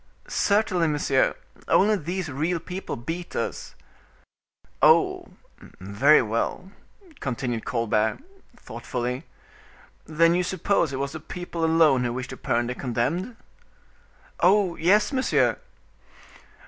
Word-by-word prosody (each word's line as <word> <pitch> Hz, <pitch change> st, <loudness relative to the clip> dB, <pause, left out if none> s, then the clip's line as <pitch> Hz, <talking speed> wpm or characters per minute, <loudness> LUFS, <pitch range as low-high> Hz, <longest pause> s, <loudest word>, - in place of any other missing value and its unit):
"Certainly, 200 Hz, -, +1 dB
monsieur; 145 Hz, -3 st, +1 dB, 0.3 s
only 210 Hz, +2 st, +4 dB
these 180 Hz, 0 st, -4 dB
real 155 Hz, +5 st, -1 dB
people 180 Hz, +3 st, -6 dB
beat 165 Hz, +9 st, -6 dB
us." 115 Hz, -, -4 dB, 1.1 s
"Oh! -, -, +4 dB, 0.5 s
very 110 Hz, +11 st, +4 dB
well," 115 Hz, -, -3 dB, 0.5 s
continued 120 Hz, -3 st, -3 dB
Colbert, 110 Hz, -2 st, 0 dB, 0.4 s
thoughtfully. 125 Hz, -, -5 dB, 0.8 s
"Then 165 Hz, +2 st, +3 dB
you 180 Hz, -, +2 dB
suppose 180 Hz, -2 st, 0 dB
it 135 Hz, -, -4 dB
was 140 Hz, +1 st, -3 dB
the 155 Hz, -, -7 dB
people 175 Hz, +1 st, -6 dB
alone 160 Hz, -5 st, +4 dB
who 120 Hz, -1 st, -1 dB
wished 130 Hz, +1 st, -5 dB
to 130 Hz, -, -8 dB
burn 120 Hz, +1 st, 0 dB
the 125 Hz, -, -3 dB
condemned?" 135 Hz, -, -2 dB, 1.0 s
"Oh! 190 Hz, -1 st, +3 dB
yes, 205 Hz, -, +3 dB
monsieur." 260 Hz, 0 st, +1 dB
155 Hz, 110 wpm, -25 LUFS, 125-180 Hz, 1.1 s, only